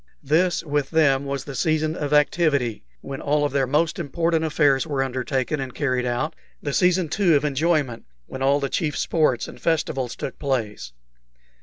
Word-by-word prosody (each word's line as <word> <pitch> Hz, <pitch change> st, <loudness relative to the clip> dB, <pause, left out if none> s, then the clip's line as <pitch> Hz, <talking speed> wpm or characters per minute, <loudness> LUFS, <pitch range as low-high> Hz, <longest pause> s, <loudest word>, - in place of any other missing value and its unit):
This 170 Hz, +5 st, +2 dB
with 145 Hz, -3 st, -1 dB
them 140 Hz, -4 st, +3 dB
was 140 Hz, -1 st, -3 dB
the 140 Hz, -, -8 dB
season 155 Hz, +2 st, 0 dB
of 145 Hz, -4 st, -3 dB
activity, 150 Hz, -6 st, +2 dB, 0.2 s
when 135 Hz, -1 st, -6 dB
all 145 Hz, 0 st, +1 dB
their 135 Hz, -1 st, 0 dB
most 160 Hz, +5 st, +1 dB
important 165 Hz, +1 st, 0 dB
affairs 145 Hz, -2 st, +2 dB
were 140 Hz, -3 st, 0 dB
undertaken 130 Hz, +2 st, -2 dB
and 130 Hz, -2 st, -5 dB
carried 130 Hz, -4 st, 0 dB
out; 120 Hz, +6 st, -2 dB, 0.2 s
the 145 Hz, -, -4 dB
season, 180 Hz, +1 st, +3 dB
too, 175 Hz, 0 st, +2 dB
of 145 Hz, +1 st, +2 dB
enjoyment, 145 Hz, -4 st, 0 dB, 0.2 s
when 130 Hz, -, -8 dB
all 140 Hz, +2 st, +3 dB
the 140 Hz, -, -1 dB
chief 150 Hz, 0 st, -2 dB
sports 150 Hz, -7 st, +1 dB
and -, -, -12 dB
festivals 135 Hz, -6 st, -1 dB
took -, -, -6 dB
place. 115 Hz, -, -2 dB
145 Hz, 170 wpm, -23 LUFS, 135-160 Hz, 0.2 s, them